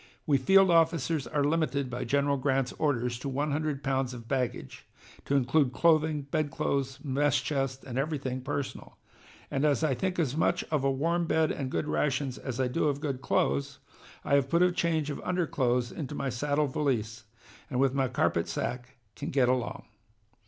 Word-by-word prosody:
We 140 -3 +3
field 195 +6 +5
officers 165 -3 +2
are 145 - 0
limited 145 -2 0
by 125 -1 -4
General 140 +3 +2
Grant's 135 -1 0
orders 125 -5 0
to 140 - -4
one 145 +3 -1
hundred 145 -2 -2
pounds 130 -1 -1
of 115 -2 -10
baggage, 130 -3 -3 0.4
to 140 - 0
include 135 0 +2
clothing, 155 -2 +3
bedclothes, 140 -2 -1
mess 140 0 +2
chest, 135 -2 -2
and 130 0 -4
everything 135 -3 -2
personal. 140 +1 -5 0.5
And 135 - 0
as 150 +1 +2
I 150 -4 +2
think 185 +7 -2
as 145 -6 0
much 160 - +1
of 150 -4 +1
a 135 - +3
warm 165 +5 0
bed 160 -1 +2
and 135 -3 -3
good 150 - -2
rations 135 -3 -1
as 130 -2 -5
I 130 - +2
do 140 +7 0
of 145 -2 +1
good 140 -4 -3
clothes, 70 - 0 0.5
I - - 0
have 140 -1 +3
put 170 +3 +4
a 180 - +4
change 160 -4 0
of - - -6
underclothes 130 -9 0
into 150 -2 -5
my 140 - -2
saddle 145 +5 0
valise, 120 -5 -2 0.4
and 125 - -2
with 135 -1 +3
my 135 -1 +1
carpet 85 -9 0
sack 125 +1 -4 0.2
can - - -5
get 130 -3 +3
along. 125 -2 -1
140 Hz, 180 wpm, -29 LUFS, 130-150 Hz, 0.5 s, field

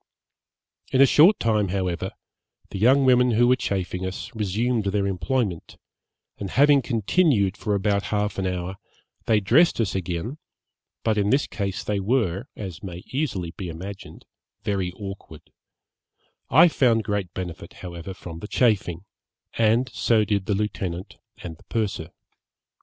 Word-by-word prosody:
In 130 - +2
a 135 - +9
short 165 - +6
time, 105 -3 +1
however, 90 -2 -2 0.6
the 95 - -5
young 130 +6 +5
women 125 -1 +4
who 120 +2 +4
were 125 - +5
chafing 95 -5 -3
us, 95 0 -5
resumed 110 +2 -1
their 100 0 0
employment, 100 -1 -2 0.6
and 100 - -4
having 140 +5 +5
continued 115 - +2
for 105 -2 -1
about 100 0 0
half 105 -1 -1
an 95 - -1
hour, 90 +1 -4 0.5
they 110 -2 +4
dressed 130 - +4
us 110 -4 0
again, 95 - -3 0.6
but 110 -2 +1
in 100 0 +1
this 135 +4 +2 0.4
they 105 -1 -1
were, 100 -3 0
as 95 -6 -7
may 90 -2 -8
easily 110 - -2
be 90 -1 -7
imagined, 95 +4 -9 0.4
very 95 -3 -1
awkward; 95 -5 -9 1.0
I - - +7
found 120 -8 +2
great 100 -3 -2
benefit, 90 -3 -6
however, 85 +1 -7
from 85 -3 -9
the 105 - -7
chafing, 100 -7 +1 0.5
and 115 +3 +2
so 110 -2 +2
did 100 -2 -1
the 105 - +1
lieutenant 95 -3 -4 0.3
and 80 -2 -7
the - - -21
purser. 105 -7 -2
100 Hz, 145 wpm, -24 LUFS, 95-115 Hz, 1.0 s, a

